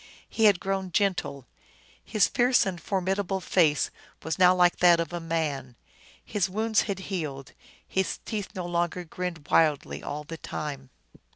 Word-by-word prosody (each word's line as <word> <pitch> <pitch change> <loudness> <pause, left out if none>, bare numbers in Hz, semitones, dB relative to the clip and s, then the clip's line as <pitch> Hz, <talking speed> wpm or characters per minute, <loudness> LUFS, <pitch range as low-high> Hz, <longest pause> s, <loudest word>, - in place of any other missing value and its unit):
He 225 - +1
had 200 -4 +6
grown 190 -1 -2
gentle. 180 - 0 0.6
His 210 -3 +2
fierce 245 -1 +3
and 180 -3 -4
formidable 190 +1 -1
face 160 -5 +2 0.3
was 160 +1 -3
now 180 0 +6
like 180 -1 +4
that 175 -1 +6
of 165 -1 -3
a 175 - -2
man. 155 -6 -2 0.5
His 195 -3 -1
wounds 220 +3 +1
had 200 - -1 0.2
healed; 140 -7 -4 0.3
his 190 0 -1
teeth 210 -3 -4
no 180 -2 -4
longer 175 +1 -1
grinned 170 -2 -5
wildly 155 -3 +2
all 150 +1 -5
the 165 +2 -8
time. 140 -4 -6
175 Hz, 155 wpm, -27 LUFS, 160-195 Hz, 0.6 s, had